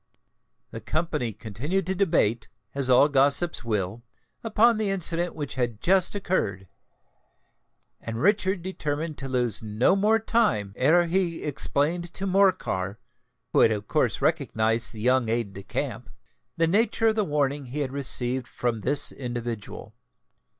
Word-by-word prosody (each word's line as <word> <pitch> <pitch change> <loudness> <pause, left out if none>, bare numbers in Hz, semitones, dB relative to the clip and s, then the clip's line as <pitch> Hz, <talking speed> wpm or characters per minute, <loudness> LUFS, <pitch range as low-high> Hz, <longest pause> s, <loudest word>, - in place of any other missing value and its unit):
The - - -7
company 155 -7 -2
continued 120 - -3
to 190 - -1
debate, 160 - +1 0.3
as 135 -2 -1
all 130 +3 +6
gossips 140 +3 +2
will, 105 -1 -2 0.4
upon 225 +1 +3
the 215 -2 -1
incident 175 -2 +1
which 145 -3 -5
had 120 -4 -2
just 190 - +2
occurred; 100 - -2 1.3
and 115 0 -5
Richard 190 - +1
determined 155 -4 -4
to 135 - -5
lose 125 -5 -1
no 110 - +1
more 210 +3 +3
time 165 - 0
ere 165 +7 +3
he 170 -1 -1
explained 155 +4 0
to 195 - -2
Morcar, 185 - +1 0.6
who - - +4
had - - +6
of 105 -2 -3
course - - 0
recognised 110 +1 +1
the 110 - -9
young 125 0 +2
aide 115 -3 -2
de 100 - -8
camp, - - -5 0.5
the 165 - +3
nature 225 +5 +2
of - - +1
the 215 - +1
warning 145 -4 -1
he 145 +5 -4
had 135 -3 -3
received 130 -2 +1
from 120 -3 -2
this 145 +6 +2
individual. 120 -4 -6
140 Hz, 145 wpm, -25 LUFS, 115-180 Hz, 1.3 s, all